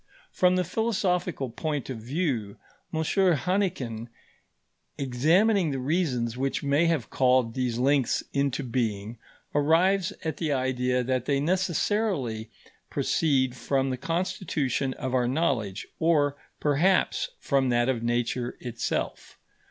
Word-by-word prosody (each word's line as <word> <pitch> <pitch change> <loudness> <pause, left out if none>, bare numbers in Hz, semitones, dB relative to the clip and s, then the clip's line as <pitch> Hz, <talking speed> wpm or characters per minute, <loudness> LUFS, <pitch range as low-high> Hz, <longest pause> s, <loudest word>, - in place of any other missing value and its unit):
From 180 0 +3
the 180 - +2
philosophical 180 - -1
point 150 +2 -3
of 130 -4 -5
view, 125 - -2 0.3
M. 160 0 -1
Hannequin, 165 - 0 0.9
examining 165 - +3
the 135 - -2
reasons 130 -5 0
which 135 +3 -2
may 145 +4 +3
have 160 -9 0
called 125 -3 +3
these 125 -2 -1
links 135 0 +2
into 140 0 0
being, 115 -3 -2 0.3
arrives 165 +6 +3
at 160 - -2
the 160 -3 -1
idea 125 -1 0
that 130 0 -1
they 140 0 +1
necessarily 170 - 0 0.4
proceed 130 -5 +1
from 135 +1 0
the - - -1
constitution 160 -4 -1
of 130 0 -4
our 125 -2 +2
knowledge, 120 - -1
or, 150 -4 +3 0.2
perhaps, 160 +6 +2
from 135 -2 +1
that 120 0 +2
of 130 -3 0
Nature 120 +1 -1
itself. 120 -2 -4
135 Hz, 120 wpm, -27 LUFS, 125-170 Hz, 0.9 s, From